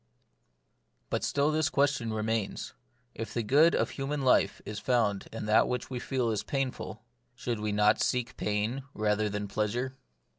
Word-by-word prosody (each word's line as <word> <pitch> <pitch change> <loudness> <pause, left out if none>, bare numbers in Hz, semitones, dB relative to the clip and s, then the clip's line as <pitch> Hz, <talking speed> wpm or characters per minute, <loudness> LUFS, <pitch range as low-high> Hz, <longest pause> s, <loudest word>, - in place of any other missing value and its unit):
DUT - - 0
still 145 +2 +2
this 155 0 +2
question 140 -5 +1
remains: 110 -1 -2 0.4
If 115 +1 -6
the 120 - 0
good 150 +9 +5
of - - +1
human 140 +1 -3
life 105 -6 +3
is 105 0 -5
found 105 -4 +1
in 115 - -5
that 105 +1 +4
which 125 +1 -3
we 125 - -2
feel 125 -2 0
as 105 - -1
painful, 130 -5 -3 0.3
should 120 -3 -3
we 105 0 -1
not 105 +1 +3
seek 125 0 0
pain 105 +5 -1
rather 105 0 +1
than 105 0 -3
pleasure 115 +6 -1
115 Hz, 160 wpm, -30 LUFS, 105-130 Hz, 0.4 s, good